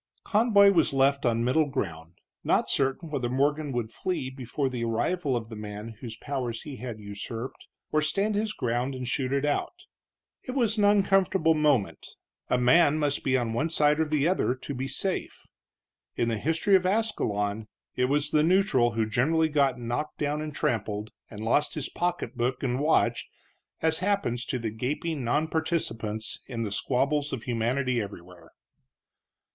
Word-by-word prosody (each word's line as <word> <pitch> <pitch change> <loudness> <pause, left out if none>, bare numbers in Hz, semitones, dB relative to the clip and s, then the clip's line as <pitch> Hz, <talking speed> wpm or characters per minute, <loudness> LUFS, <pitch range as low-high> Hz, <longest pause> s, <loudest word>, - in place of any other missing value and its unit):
Conboy 205 -2 +5
was 165 -6 +2
left 135 0 +3
on 115 0 +1
middle 145 +5 +2
ground, 85 - -4 0.3
not - - +2
certain 140 +4 0
whether 130 -5 -1
Morgan 145 +3 0
would 120 -3 -2
flee 135 -4 -3
before 130 +2 -3
the 125 -2 -3
arrival 130 +6 0
of 115 -2 -3
the 115 - -8
man 105 +1 -7
whose 115 -3 -7
powers 125 -4 -4
he 145 -4 -8
had 120 -2 -6
usurped, 105 +4 -7 0.2
or 155 - +2
stand 195 +8 0
his 210 +1 0
ground 125 - -1
and 130 -1 -5
shoot 130 0 -1
it 140 +1 +1
out. 350 - -2 0.6
It 255 - -6
was 230 -5 +1
an 205 - +4
uncomfortable 195 -4 +3
moment; 150 -9 +1 0.5
a 125 - +3
man 145 +5 +5
must 145 -2 0
be 130 -1 +2
on 120 -3 -1
one 145 +8 0
side 150 -1 +3
or 160 - +3
the 150 0 +1
other 175 -8 +1
to 135 +2 -7
be 130 +1 -3
safe. 180 +8 -3 0.7
In 120 - 0
the 110 -2 -1
history 165 - +2
of 185 -1 +3
Ascalon 110 - -1 0.3
it 125 - +2
was 145 +3 0
the 150 - +4
neutral 160 - +3
who 110 0 +1
generally 155 +9 +2
got 140 -4 +2
knocked 120 +5 -3
down 150 0 -1
and 155 0 -4
trampled, 105 -5 -2 0.2
and 105 -1 -9
lost 145 +6 +2
his 150 - -3
pocketbook 130 -8 -2
and 125 -1 0
watch, 155 +3 +2 0.6
as 160 0 +3
happens 185 -12 0
to 130 - -2
the 115 -3 -3
gaping 140 +7 -3
nonparticipants 145 -6 -1
in 120 -3 -3
the 105 - -3
squabbles 140 +7 0
of 130 -4 -4
humanity 125 +1 0
everywhere. 90 -4 -10
135 Hz, 170 wpm, -27 LUFS, 120-160 Hz, 0.7 s, Conboy